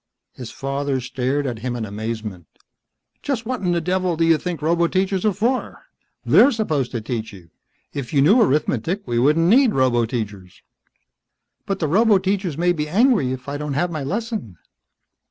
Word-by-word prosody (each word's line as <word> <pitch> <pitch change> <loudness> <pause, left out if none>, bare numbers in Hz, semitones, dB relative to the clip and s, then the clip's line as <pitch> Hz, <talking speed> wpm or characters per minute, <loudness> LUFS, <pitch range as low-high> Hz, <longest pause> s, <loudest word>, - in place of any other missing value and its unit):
His 125 -3 -8
father 135 0 -2
stared 130 +3 -2
at 120 -4 -3
him 120 +1 -3
in 115 -2 -3
amazement. 105 -4 -6 0.7
"Just 255 -5 -3
what 255 +1 -3
in 180 -2 0
the 175 - +1
devil 180 0 -1
do 165 - +2
you 165 -2 +4
think 180 -3 -4
roboteachers 175 +4 +1
are 215 - +4
for? 230 +7 -2 0.4
They're 265 - +6
supposed 155 - -1
to 115 - -2
teach 110 0 -4
you. 90 -5 -15 0.4
If 140 -4 -5
you 145 - +2
knew 210 - +5
arithmetic 155 - 0
we 120 -1 -1
wouldn't 150 +6 +3
need 245 +4 +5
roboteachers." 115 -7 -1 1.0
"But 195 -2 -1
the 160 - -1
roboteachers 190 -2 +2
may 175 +1 +2
be 150 -2 -3
angry 210 - +3
if 130 0 -6
I 140 +1 -3
don't 150 -1 -4
have 175 +4 0
my 155 -4 -4
lesson." 205 - -4
150 Hz, 170 wpm, -21 LUFS, 125-190 Hz, 1.0 s, They're